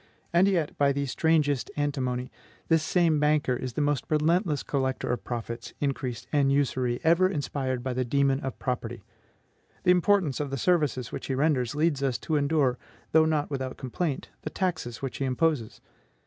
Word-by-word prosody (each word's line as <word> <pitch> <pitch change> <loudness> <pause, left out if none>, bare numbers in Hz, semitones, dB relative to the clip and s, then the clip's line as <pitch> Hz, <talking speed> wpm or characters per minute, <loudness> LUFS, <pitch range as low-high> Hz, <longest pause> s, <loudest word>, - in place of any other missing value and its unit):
And 175 +3 +5
yet, 175 -6 0
by 140 -1 +4
the 140 0 -1
strangest 145 -2 +1
antinomy, 130 -4 -1 0.4
this 165 -1 +4
same 165 -1 +2
banker 150 -3 +2
is 125 0 -5
the 150 - 0
most 145 -2 0
relentless 155 0 +1
collector 130 -3 -1
of 125 - -4
profits, 115 0 -5
increase, 130 -5 -2
and 140 -2 +3
usury 130 -3 +1
ever 170 +3 +4
inspired 135 -6 -2
by 130 -1 -2
the 130 +1 0
demon 135 +2 +2
of 135 -2 -5
property. 120 -4 -4 0.8
The 180 - +5
importance 180 -5 +3
of 145 -1 -2
the 135 - -3
services 145 -7 +1
which - - -6
he 135 - -1
renders 135 -3 +1
leads 150 -2 +1
us 135 -3 0
to 160 - -1
endure, 140 -3 +2 0.3
though 160 0 +5
not 155 -2 0
without 130 -2 -3
complaint, 135 +3 -3
the - - -4
taxes 160 - -3
which 135 - -3
he 135 - -1
imposes. 130 -3 0
140 Hz, 175 wpm, -27 LUFS, 130-155 Hz, 0.8 s, And